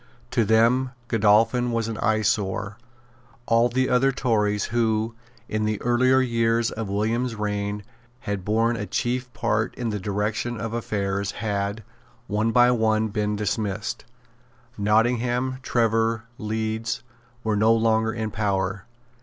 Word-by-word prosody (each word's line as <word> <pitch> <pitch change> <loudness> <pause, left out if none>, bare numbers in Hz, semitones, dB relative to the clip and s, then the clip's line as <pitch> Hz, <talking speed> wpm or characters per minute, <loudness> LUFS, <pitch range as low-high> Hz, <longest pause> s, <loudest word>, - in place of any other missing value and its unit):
To 125 -2 +2
them 115 +4 +3 0.2
Godolphin 115 +3 +3
was 115 -1 -1
an 115 -2 -4
eyesore. 105 -2 0 0.7
All 115 +1 +3
the 130 +2 +1
other 125 +2 +3
Tories 105 -6 +1
who, 110 -1 +1 0.3
in 110 0 -1
the 110 -1 -1
earlier 130 +2 +4
years 115 -2 +1
of 110 -2 -5
William's 115 +4 0
reign, 105 -1 -2 0.4
had 100 -4 -3
borne 115 +4 +1
a 105 -2 -4
chief 125 +5 -2
part 110 -1 -1
in 120 -2 -3
the 105 -1 -2
direction 105 +4 -2
of 115 +1 -4
affairs, 100 -3 -2
had, 100 0 -2 0.4
one 110 +2 0
by 125 +1 +5
one, 110 -2 +2
been 105 0 -1
dismissed. 105 +2 -2 0.7
Nottingham, 120 +4 +1
Trevor, 115 -2 +1 0.2
Leeds, 110 0 -2 0.4
were 110 -1 0
no 110 +2 +4
longer 110 0 +2
in 110 -1 -3
power. 100 -2 -1
110 Hz, 130 wpm, -24 LUFS, 105-120 Hz, 0.7 s, by